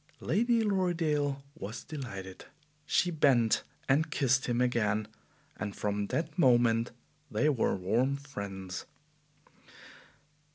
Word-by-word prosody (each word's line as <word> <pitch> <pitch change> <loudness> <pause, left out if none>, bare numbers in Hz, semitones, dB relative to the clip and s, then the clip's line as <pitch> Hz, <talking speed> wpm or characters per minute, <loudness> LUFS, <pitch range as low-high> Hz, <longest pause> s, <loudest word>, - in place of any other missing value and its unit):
Lady 235 +1 +2
Lorridaile 165 -8 0
was 110 +1 -7
delighted. 95 -11 -7 0.4
She 180 - +2
bent 130 -8 +3 0.3
and 150 +4 +3
kissed 130 -3 +2
him 120 -1 0
again, 110 -4 +1 0.5
and 100 -1 -4
from 105 -1 -1
that 160 - -3
moment 120 -4 +4 0.4
they 120 +8 +2
were 130 -7 +1
warm 115 +9 +1
friends. 100 -9 -6
125 Hz, 100 wpm, -31 LUFS, 105-150 Hz, 0.5 s, moment